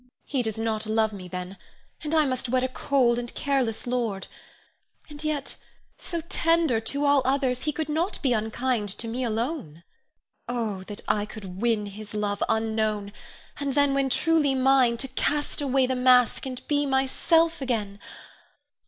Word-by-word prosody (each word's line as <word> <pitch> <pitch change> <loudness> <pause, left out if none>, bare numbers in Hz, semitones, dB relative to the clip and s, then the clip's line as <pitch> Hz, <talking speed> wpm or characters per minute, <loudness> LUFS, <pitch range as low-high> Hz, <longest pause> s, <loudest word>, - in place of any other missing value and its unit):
_] - - -29 0.2
He 270 -3 -1
does 220 -3 -2
not 220 -1 -1
love 220 0 +1
me, 185 -3 -8
then, 180 +1 -6 0.5
and 310 +1 -1
I 310 -1 +5
must 255 -2 -2
wed 255 +1 +2
a - - +2
cold 255 -2 +2
and 240 0 -5
careless 265 -6 0
lord. 235 -6 -1 0.8
And 295 0 -8
yet 300 -3 -2 0.4
so 340 -2 -3
tender 330 -6 +2
to 280 +6 -1
all 285 -1 +5
others, 260 -1 +1
he 305 - +1
could 315 0 -3
not 325 +6 -1
be 260 -3 +3
unkind 220 0 -1
to 230 - -2
me 245 +3 -2
alone. 225 - -3 0.7
Oh, 225 -6 -2
that 205 0 -8
I 210 0 +1
could 195 -3 -9
win 225 -3 +1
his 210 +1 -9
love 205 -1 -1
unknown, 220 -2 0 0.5
and 280 -2 -2
then 285 -1 +4
when 275 -1 +1
truly 300 -1 +3
mine, 260 -2 +4
to 270 - -1
cast 295 +3 -1
away 270 -2 +2
the 260 0 -1
mask, 250 0 +4
and 255 -1 -7
be 290 -1 +1
myself 325 +5 +2
again. 215 -6 -2
250 Hz, 170 wpm, -26 LUFS, 220-280 Hz, 0.8 s, I